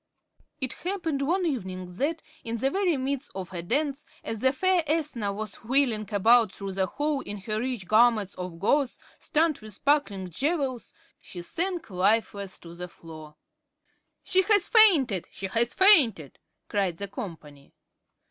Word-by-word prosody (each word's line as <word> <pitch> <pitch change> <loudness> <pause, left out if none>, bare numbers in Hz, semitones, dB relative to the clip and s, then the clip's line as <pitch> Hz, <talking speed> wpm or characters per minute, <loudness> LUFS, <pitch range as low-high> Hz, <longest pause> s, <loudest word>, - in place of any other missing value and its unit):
It 255 -4 -2
happened 340 -6 -3
one 355 +6 +1
evening 185 - -4
that, 315 +6 -1 0.2
in 230 0 -3
the 270 +4 0
very 375 -5 +1
midst 270 0 -3
of 190 -1 -6
a 175 - -4
dance, 280 - -1 0.2
as 225 -1 -4
the 260 +3 +3
fair 370 +5 +2
Ethna 285 -9 -1
was 215 +2 -5
whirling 230 -4 0
about 225 +1 +4
through 195 0 -6
the 190 0 0
hall 295 +3 -1
in 205 - -7
her 215 +2 -2
rich 240 -6 -3
garments 215 -2 +4
of 180 -2 -7
gauze, 270 - +1 0.2
studded 310 -2 +1
with 215 -1 -7
sparkling 200 -8 0
jewels, 275 - -2 0.2
she 175 -2 -9
sank 345 - -3
lifeless 200 0 0
to 170 -1 -12
the 180 +1 -7
floor. 155 -3 -12 0.9
"She 375 - +3
has 405 0 +3
fainted, 305 - +5
she 190 +1 -7
has 230 +5 0
fainted," 270 - +4 0.3
cried 195 -5 -1
the 200 - -4
company. 155 -8 -9
230 Hz, 155 wpm, -27 LUFS, 190-295 Hz, 0.9 s, fainted